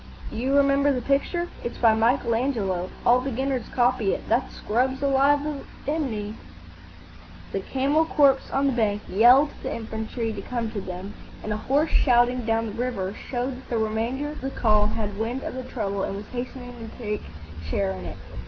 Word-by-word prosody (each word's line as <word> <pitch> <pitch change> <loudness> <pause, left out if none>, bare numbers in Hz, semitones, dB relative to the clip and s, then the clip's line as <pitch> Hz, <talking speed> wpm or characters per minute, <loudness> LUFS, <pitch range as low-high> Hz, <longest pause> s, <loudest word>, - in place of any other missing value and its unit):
"D'you 260 +5 +1
remember 280 0 +4
the 260 - 0
picture? 315 +6 +1 0.2
It's 240 - -4
by 225 -2 +5
Michael 230 +2 +2
Angelo; 205 -8 0 0.2
all 245 +1 +5
beginners 265 -1 -2
copy 245 -5 +2
it. - - -9
That 250 +3 +1
scrub's 260 +5 -1
alive 280 +1 +4
with 295 -2 -4 0.2
enemy." 240 -9 -2 1.2
The 195 - -1
camel 275 +9 +1
corps 280 -4 +4
on 275 +1 +1
the 275 - +3
bank 210 -3 0
yelled 250 +8 +6
to - - -17
the - - -3
infantry 225 0 -4
to - - -5
come 235 -3 -3
to 205 - -4
them, 185 +2 -6 0.3
and 215 - -2
a - - -2
hoarse 285 +8 +1
shouting 245 -1 +3
down 225 0 +2
the 220 - -4
river 200 -7 -2
showed 250 +3 -4
that 260 - -14
the 235 - 0
remainder 230 +6 -1
of 300 - -9
the 270 - -2
column 215 -4 +2
had 210 -2 -3
wind 240 +4 -2
of - - -4
the 260 - -4
trouble 200 -5 -3
and 195 - -2
was 205 +1 -6
hastening 245 0 -6
to 230 -2 -10
take 210 -3 -3 0.5
share 95 +3 0
in 95 -1 -6
it. 85 - -7
240 Hz, 190 wpm, -25 LUFS, 215-270 Hz, 1.2 s, yelled